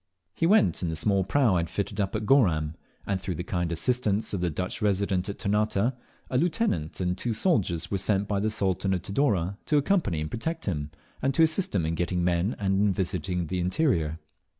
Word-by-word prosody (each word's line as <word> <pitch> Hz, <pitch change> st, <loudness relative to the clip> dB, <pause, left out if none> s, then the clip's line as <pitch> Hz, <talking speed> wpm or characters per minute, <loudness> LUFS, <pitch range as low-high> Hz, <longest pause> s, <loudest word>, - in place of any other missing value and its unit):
He 165 Hz, -, +1 dB
went 210 Hz, +3 st, +4 dB
in 90 Hz, -, -1 dB
the 80 Hz, -, -2 dB
small 100 Hz, +3 st, +2 dB
prau 115 Hz, +3 st, +2 dB
I -, -, +3 dB
had 85 Hz, -1 st, -2 dB
fitted 100 Hz, +2 st, -2 dB
up 100 Hz, +2 st, -2 dB
at 105 Hz, 0 st, -2 dB
Goram, 85 Hz, -, +3 dB, 0.3 s
and 95 Hz, -2 st, -1 dB
through 95 Hz, -2 st, -3 dB
the 90 Hz, -, -4 dB
kind 85 Hz, -2 st, -2 dB
assistance 105 Hz, +4 st, 0 dB
of 95 Hz, -, -1 dB
the 90 Hz, -, +1 dB
Dutch 90 Hz, +4 st, -4 dB
Resident 100 Hz, -2 st, 0 dB
at 100 Hz, -, -5 dB
Ternate, 105 Hz, +2 st, 0 dB
a 125 Hz, +3 st, -3 dB
lieutenant 160 Hz, -, 0 dB
and 90 Hz, -1 st, 0 dB
two 120 Hz, +4 st, -2 dB
soldiers 95 Hz, -, +1 dB
were 100 Hz, -, 0 dB
sent 100 Hz, +1 st, +1 dB
by 100 Hz, -1 st, 0 dB
the 110 Hz, +2 st, +1 dB
Sultan 95 Hz, -2 st, 0 dB
of 90 Hz, -, -4 dB
Tidore 100 Hz, -, 0 dB
to 150 Hz, -, +3 dB
accompany 145 Hz, -, +1 dB
and 75 Hz, 0 st, -4 dB
protect 160 Hz, +8 st, -3 dB
him, 75 Hz, -6 st, -2 dB, 0.3 s
and 135 Hz, 0 st, 0 dB
to 165 Hz, -, +5 dB
assist 160 Hz, -, +1 dB
him 85 Hz, -5 st, +1 dB
in 80 Hz, -, -1 dB
getting 90 Hz, +1 st, -1 dB
men 90 Hz, +4 st, +1 dB
and 95 Hz, -1 st, +1 dB
in 105 Hz, -1 st, +3 dB
visiting 90 Hz, -1 st, -2 dB
the 90 Hz, +3 st, -3 dB
interior. 90 Hz, -, +1 dB
100 Hz, 215 wpm, -27 LUFS, 90-115 Hz, 0.3 s, to